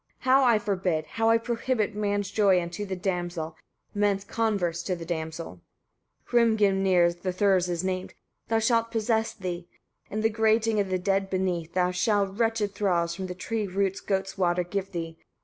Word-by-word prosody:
how 265 +1 +4
I 235 -3 +5
forbid, 185 -6 -1
how 225 +5 0
I 230 - +6
prohibit 230 -1 -1
man's 205 -1 -1
joy 195 -4 +4
unto 175 +4 -5
the 190 - -3
damsel, 175 -3 -3 0.4
man's 205 -1 +1
converse 200 -7 -1
to 185 +1 -2
the 170 -1 -8
damsel. 160 - -5 0.7
35. - - -20 0.3
Hrimgrimnir 190 -4 +3
the 185 - -1
Thurs 185 -1 +2
is 175 0 -2
named, 185 0 -3 0.3
that 225 -1 +1
shall 230 0 +3
possess 225 0 0
thee, 180 -3 -5 0.4
in 215 - -2
the 220 - +3
grating 220 0 +2
of 200 -2 0
the 185 - +1
dead 195 +1 0
beneath; 180 -3 -1
there 180 0 +2
shall 205 +2 +2
wretched 210 0 -1
thralls, 175 -5 +1
from 185 +2 -5
the 180 - -6
tree's 210 0 -3
roots, 195 0 0
goats' 195 0 -2
water 180 -1 +2
give 195 +2 -4
thee. 165 -2 -5
195 Hz, 175 wpm, -27 LUFS, 180-215 Hz, 0.7 s, I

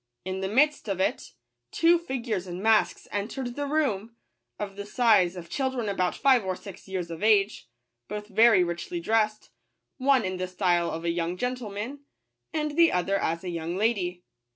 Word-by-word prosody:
In 190 0 -3
the 190 - -2
midst 285 +6 +2
of 195 -2 -2
it, 190 - -1 0.4
two 335 - +4
figures 235 - -3
in 175 0 -5
masks 220 +1 +2
entered 240 +5 -3
the 285 0 -3
room, 230 -8 -1 0.4
of 200 -1 -5
the 200 - -5
size 210 -7 +3
of 175 -2 -8
children 260 0 -2
about 185 -3 0
five 265 -5 +4
or 185 -1 -2
six 195 0 -11
years 180 -3 -4
of 165 - -7
age, 210 - +2 0.4
both 210 0 -5
very 220 -2 +5
richly 175 - -4
dressed, 215 -7 0 0.5
one 260 -3 +3
in 185 0 -3
the 185 0 -2
style 180 -2 +1
of 165 +1 -5
a 170 - +2
young 170 +1 -2
gentleman, 250 +2 -4 0.5
and 305 -2 -1
the 335 -1 +6
other 195 +2 +1
as 165 0 -1
a 180 - -4
young 170 +1 -3
lady. 190 -5 0
205 Hz, 175 wpm, -27 LUFS, 180-245 Hz, 0.5 s, the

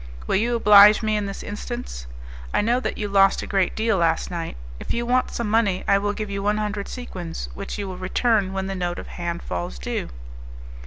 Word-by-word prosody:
Will - - 0
you 235 +4 +1
oblige 210 -1 +7
me 215 0 +1
in 205 -1 -1
this 195 - -6
instance? 210 - -6 0.5
I - - +4
know 235 +4 +2
that - - -3
you 210 - -2
lost 195 -1 +4
a - - -4
great 195 -3 0
deal 220 -2 +1
last 165 -1 +1
night; 165 - -4 0.2
if - - -3
you 235 0 -1
want 255 +1 +2
some 235 - -3
money 205 -4 +1
I 200 - +4
will 205 0 -1
give 215 -1 -5
you 200 0 -3
one 210 +1 +1
hundred 210 -1 -3
sequins, 175 - -6
which 65 - -6
you 200 -1 -4
will 185 -1 -6
return 200 +1 +1
when 190 0 -3
the 195 - -3
note 175 -2 -2
of - - -7
hand 170 -1 -4
falls 85 -9 -4
due." - - -4
200 Hz, 220 wpm, -23 LUFS, 185-215 Hz, 0.5 s, oblige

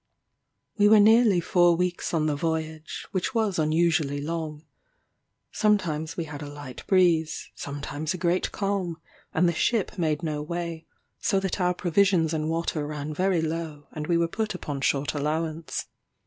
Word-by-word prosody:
We 205 - +6
were 215 0 +8
nearly 220 -2 +6
four 175 0 +4
weeks 180 +1 -1
on 160 -2 +1
the 150 -1 +1
voyage, 160 0 -3
which 185 +6 -2
was 215 -6 +1
unusually 155 -2 +2
long. 155 0 -4 0.9
Sometimes 170 -8 0
we 170 - -1
had 150 -2 -8
a 145 - -6
light 145 -3 -9
breeze, 170 -4 +2
sometimes 145 +2 -4
a - - -5
great 175 +1 0
calm, 195 -5 -2 0.3
and 175 +2 +3
the 170 - +2
ship 205 +2 0
made 155 -1 0
no 150 -2 -2
way; 170 +1 -4 0.3
so 195 -4 +2
that 190 0 -2
our 180 0 +2
provisions 175 -2 +2
and 155 0 -1
water 165 -2 -1
ran 150 0 -4
very 180 0 +1
low, 160 -2 -4
and 150 -1 -5
we 170 - +3
were 170 0 +2
put 215 +3 -3
upon 145 -6 -5
short 140 -1 +1
allowance. 155 +2 -2
165 Hz, 160 wpm, -26 LUFS, 155-180 Hz, 0.9 s, were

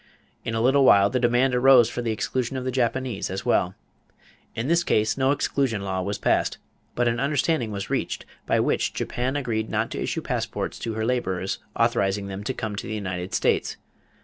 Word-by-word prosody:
In 115 - -3
a 115 - 0
little 135 +3 +4
while 100 -5 +6
the 125 - +1
demand 125 +2 +3
arose 125 -1 +6
for 120 - -4
the 120 - -2
exclusion 125 +4 -2
of 130 - -3
the 130 - -1
Japanese 125 -3 -1
as 95 +1 -4
well. 90 +1 +2 0.8
In 115 +2 -2
this 170 +2 +3
case 110 -9 +1
no 130 0 +1
exclusion 135 -6 0
law 95 -1 -2
was 100 +2 -2
passed; - - +1 0.4
but 120 0 +2
an 120 0 0
understanding 140 -2 +1
was 100 -2 -5
reached - - -2 0.2
by - - +2
which - - 0
Japan 130 +3 -2
agreed 115 -6 -2
not - - -1
to - - -4
issue - - -2
passports - - -3
to 115 -1 -4
her 110 0 -1
laborers 95 -7 -1 0.2
authorizing 100 -4 +1
them 100 +1 -6
to - - -1
come 110 -2 -4
to - - -5
the 110 - -3
United 90 -3 -4
States. - - +1
115 Hz, 200 wpm, -25 LUFS, 100-130 Hz, 0.8 s, while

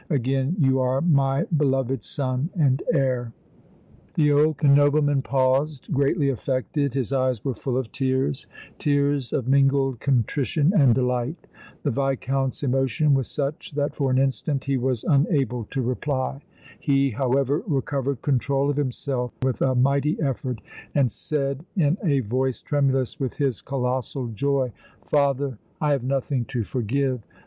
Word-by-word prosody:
Again 135 +1 0
you 135 -5 +3
are 130 +1 +1
my 140 -5 +2
beloved 135 -4 +1
son 130 +1 -2
and 140 -6 +2
heir." 125 -3 0 0.8
The 150 -2 +3
old 150 +1 +2
nobleman 145 0 +4
paused, 135 +3 0
greatly 140 +2 +2
affected; 135 +2 -1
his 135 -1 -1
eyes 130 -4 0
were 135 - 0
full 125 +3 -3
of 130 -4 -3
tears, 130 - -1 0.3
tears 145 -2 +1
of 130 -4 -1
mingled 135 -2 +3
contrition 140 - +1
and 135 - +5
delight. 125 +4 -1 0.4
The 145 - +1
Viscount's 135 +1 -1
emotion 135 +2 +2
was 135 -3 +1
such 145 +1 -4
that 145 0 -1
for 140 -3 0
an 130 - +2
instant 135 +1 0
he 140 0 0
was 130 -2 -1
unable 135 -6 +1
to 135 +4 -3
reply. 130 +2 -2 0.4
He, 140 -2 +2
however, 135 +4 +1
recovered 140 -3 -1
control 140 +1 +1
of 145 - -4
himself 130 -2 -2
with 130 -2 0
a 130 -1 +2
mighty 140 +4 +2
effort, 130 -5 -2 0.3
and 135 -5 +3
said, 140 +1 -3
in 165 +1 +2
a 140 -6 +2
voice 130 +3 -1
tremulous 135 -3 0
with 130 -3 -2
his 135 -8 -1
colossal 130 -1 -2
joy: 130 +3 0 0.3
"Father, 140 -4 +1 0.2
I 150 -1 +1
have 140 -3 +1
nothing 135 -1 -1
to 120 +1 -2
forgive. 130 +3 -1
135 Hz, 145 wpm, -24 LUFS, 130-140 Hz, 0.8 s, and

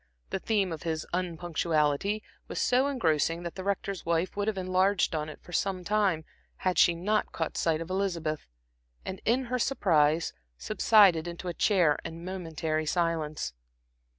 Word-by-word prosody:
The - - -1
theme 200 -3 +1
of 160 - -5
his 160 -2 -2
unpunctuality 170 +1 0 0.2
was - - -4
so 255 +2 +3
engrossing 165 - +1
that 170 - -5
the 190 - -6
Rector's 200 -1 -2
wife 170 +2 0
would 205 0 -1
have 215 -2 0
enlarged 185 0 +2
on 155 -1 -2
it 155 - -10
for 175 - -12
some 190 -1 0
time, 195 -6 +1 0.3
had 185 -1 0
she 170 - +6
not 210 +5 0
caught 160 - -3
sight 165 -1 +1
of 165 +2 -6
Elizabeth, 170 -6 -2 0.6
and 190 - -5
in 245 +4 +2
her 250 0 -2
surprise 165 - +2 0.2
subsided 200 -6 +4
into 175 +1 -5
a - - -3
chair 175 -6 +3
and 165 +1 -7
momentary 160 -4 -3
silence. 160 - -1
175 Hz, 160 wpm, -29 LUFS, 160-195 Hz, 0.6 s, she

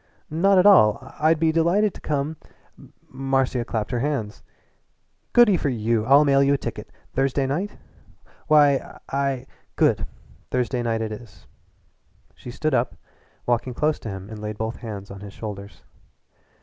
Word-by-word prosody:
"Not 190 +5 +3
at 185 - +5
all. 110 - +7 0.2
I'd 155 +1 +3
be 160 0 +3
delighted 175 +6 +2
to - - -12
come 150 +1 -2 0.4
" - - -20
Marcia 135 -2 0
clapped 110 -1 -3
her 120 - 0
hands. 125 -6 -3 0.9
"Goodyforyou! 120 - +3
I'll 140 +3 +6
mail 140 -1 +4
you 140 +1 +4
a - - -1
ticket - - -7 0.2
Thursday 135 +1 +1
night?" 170 +10 -3 0.7
"Why, 145 -3 +3
I 135 -2 -1 0.2
" - - -41
"Good! - - +2 0.4
Thursday 125 0 -1
night 115 -1 -1
it 110 - -4
is." 105 -6 -11 0.9
She - - -11
stood 150 +5 -2
up - - +1
and - - -22 0.5
walking 120 +1 -1
close 150 +3 0
to 110 - -7
him 95 -1 -6
laid 105 -1 -6
both 110 +2 -3
hands 100 -4 -8
on 100 - -9
his 100 0 -10
shoulders. 100 -2 -8
130 Hz, 155 wpm, -23 LUFS, 110-150 Hz, 0.9 s, all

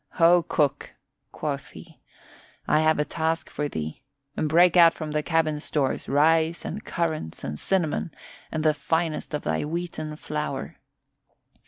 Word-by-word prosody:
"Ho, 175 0 +5
cook," 145 -4 -1 0.4
quoth - - -4
he, - - -14 0.7
"I 155 - +4
have 155 0 +3
a 150 - +1
task 160 +1 -2
for 150 - -2
thee. 80 - -5 0.3
Break 170 +3 +4
out 170 -2 +7
from 155 -2 -5
the 150 0 0
cabin 155 -2 +1
stores 145 -3 -2
rice 160 +4 +3
and 205 +6 -5
currants 160 - -3
and 75 +1 -4
cinnamon 175 -5 0 0.4
and 155 -1 -2
the 155 -1 +4
finest 160 +1 -1
of 150 - -4
thy - - -1
wheaten 155 -1 -4
flour. 150 -3 -4
155 Hz, 145 wpm, -25 LUFS, 150-165 Hz, 0.7 s, out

